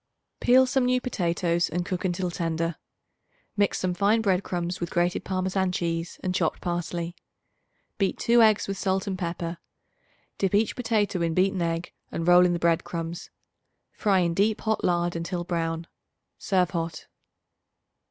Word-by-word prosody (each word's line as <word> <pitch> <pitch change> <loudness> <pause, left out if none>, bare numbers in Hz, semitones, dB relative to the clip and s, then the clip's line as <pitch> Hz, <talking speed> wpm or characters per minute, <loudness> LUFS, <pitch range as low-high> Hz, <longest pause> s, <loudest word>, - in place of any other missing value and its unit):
Peel 260 +1 +5
some 260 0 +1
new 250 0 +2
potatoes 175 -7 0
and 175 +1 -2
cook 185 -1 -3
until 180 -1 -1
tender. 165 -1 -2 0.8
Mix 205 -1 +2
some 185 -1 -1
fine 200 +5 +3
bread 190 -3 +2
crumbs 175 0 -3
with 175 - -3
grated 175 +1 0
Parmesan 190 0 0
cheese 170 -1 -3
and 185 - -1
chopped 175 -4 0
parsley. 175 0 -3 0.8
Beat 195 -2 +1
2 235 0 +4
eggs 215 -2 +4
with 195 -1 -4
salt 190 0 0
and 195 - -2
pepper; 170 -1 -4 0.8
dip 195 0 +1
each 215 +2 +2
potato 215 -6 0
in 165 -1 0
beaten 190 0 +2
egg 165 0 -2 0.2
and 165 - -3
roll 180 0 +7
in 175 - +1
the - - 0
bread 170 -1 +2
crumbs. 170 0 -5 0.6
Fry 195 -4 +2
in 170 -1 +1
deep 205 +4 +1
hot 220 0 -1
lard 175 -1 +1
until 175 +1 -3
brown. 165 -1 -2 0.5
Serve 185 -3 +1
hot. 165 -2 -4
180 Hz, 160 wpm, -26 LUFS, 170-195 Hz, 0.8 s, roll